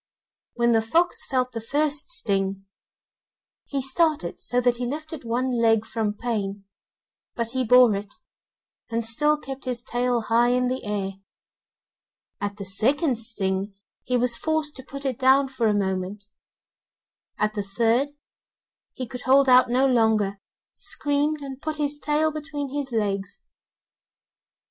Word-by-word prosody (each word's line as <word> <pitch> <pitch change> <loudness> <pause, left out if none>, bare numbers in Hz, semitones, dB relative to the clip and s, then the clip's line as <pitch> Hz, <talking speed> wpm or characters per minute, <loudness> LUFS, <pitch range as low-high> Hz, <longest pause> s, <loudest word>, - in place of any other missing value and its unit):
When 235 0 +2
the 225 -1 +4
fox 335 +11 +1
felt 255 -2 0
the 230 - -5
first 290 +5 +1
string, 195 - 0 1.0
he 275 -2 -3
started 290 - 0
so 245 - 0
that 245 -1 +2
he 245 - -3
lifted 310 +3 -6
one 245 +3 -1
leg, 225 -1 +3
from 220 -2 -2
pain, 205 -4 -3 0.7
but 230 -1 -2
he 260 0 0
bore 250 -1 +6
it, 200 +1 -5 0.8
and 230 -1 -1
still 295 +7 +4
kept 275 -2 -8
his 245 -2 -2
tail 245 -1 0
high 230 +2 +3
in 250 0 +1
the 255 +1 -3
air; 200 -2 -2 1.3
at 205 0 -3
the 200 - -6
second 250 - +1
sting, 195 -3 -1 0.3
he 250 - 0
was 245 0 +1
forced 315 +2 -1
to 260 - -9
put 275 +2 -8
it 260 -4 -2
down 265 +1 +5
for 255 -4 -1
a - - +3
moment; 195 0 -2 1.1
at 210 0 0
the 210 - -2
third, 230 +7 +1 0.9
he 255 - -4
could 250 0 -8
hold 270 +2 +4
out 255 -1 +6
no 255 +3 +3
longer, 220 -6 +2 0.3
screamed, 290 +1 -1
and 270 -1 -7
put 310 -1 -3
his 295 -1 0
tail 300 +2 +1
between 295 -2 -5
his 285 -2 -3
legs. 200 -3 -2
245 Hz, 150 wpm, -24 LUFS, 215-275 Hz, 1.3 s, bore